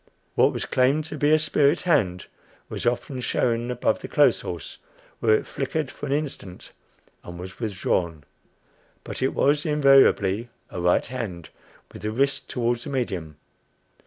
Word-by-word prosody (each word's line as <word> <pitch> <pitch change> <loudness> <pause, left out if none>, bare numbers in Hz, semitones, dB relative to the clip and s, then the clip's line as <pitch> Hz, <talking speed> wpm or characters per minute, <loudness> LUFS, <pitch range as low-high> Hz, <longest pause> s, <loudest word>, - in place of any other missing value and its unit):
What - - +4
was - - -4
claimed 135 +4 +2
to 155 - -6
be 145 +2 +3
a 155 - +7
spirit 150 0 +2
hand 105 - +1 0.4
was - - -3
often 125 +2 -1
shown 120 -1 0
above 125 -1 0
the - - -7
clothes - - +3
horse, 85 -5 -7 0.4
where 110 -2 +4
it - - -1
flickered 140 +1 -3
for 145 - -7
an - - -4
instant 140 -11 -4 0.5
and 90 0 -9
was 95 +1 -9
withdrawn; 90 -7 -1 0.8
but - - -6
it 130 - 0
was 145 +1 +2
invariably 135 - +4 0.2
a 90 - -5
right 90 0 +3
hand 105 -10 -6 0.4
with - - -10
the 105 - -2
wrist 140 +4 0
toward 120 -1 0
the 145 - -7
medium. 90 - -3
125 Hz, 160 wpm, -24 LUFS, 95-140 Hz, 0.8 s, a